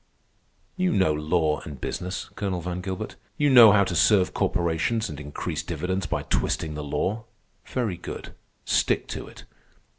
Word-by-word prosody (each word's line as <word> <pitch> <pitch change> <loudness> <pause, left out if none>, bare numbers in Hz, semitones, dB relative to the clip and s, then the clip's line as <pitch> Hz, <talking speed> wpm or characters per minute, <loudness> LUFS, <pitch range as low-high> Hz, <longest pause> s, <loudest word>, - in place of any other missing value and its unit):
"You 185 -1 +1
know 95 -5 +3
law 75 0 +1
and 70 -4 -9
business, 90 +6 -4
Colonel 95 -3 -2
Van 90 +1 -4
Gilbert. 95 0 -5 0.2
You 145 -1 +3
know 120 -4 +10
how 100 -1 +5
to 95 -2 -3
serve 95 +2 +4
corporations 85 +7 0
and 75 - -7
increase 75 +2 -4
dividends 90 +4 -3
by - - -2
twisting 80 -1 -1
the 75 0 -5
law. 95 +10 -2 0.4
Very 115 -9 -2
good. - - -8 0.3
Stick - - +2
to - - -5
it. - - -13
90 Hz, 155 wpm, -25 LUFS, 80-100 Hz, 0.4 s, know